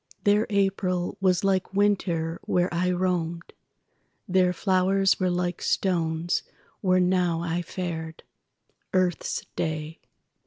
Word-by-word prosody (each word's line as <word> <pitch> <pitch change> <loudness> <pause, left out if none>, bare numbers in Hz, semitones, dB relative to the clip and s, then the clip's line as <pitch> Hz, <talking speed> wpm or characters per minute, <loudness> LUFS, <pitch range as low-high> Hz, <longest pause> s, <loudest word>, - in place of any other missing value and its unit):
Their 210 +2 +3
April 195 -3 0
was 185 -1 +2
like 195 -1 0
winter 180 -5 +1
where 180 0 +1
I 180 +1 +1
roamed; 175 -2 -1 0.7
Their 185 -1 +3
flowers 190 +1 +2
were 185 -1 +1
like 175 0 -1
stones 170 -2 0 0.4
where 185 -2 +3
now 180 -2 +2
I 170 +1 -1
fared. 165 -2 -5 0.7
Earth's 180 -2 0
day! 155 0 -3
180 Hz, 110 wpm, -26 LUFS, 170-190 Hz, 0.7 s, Their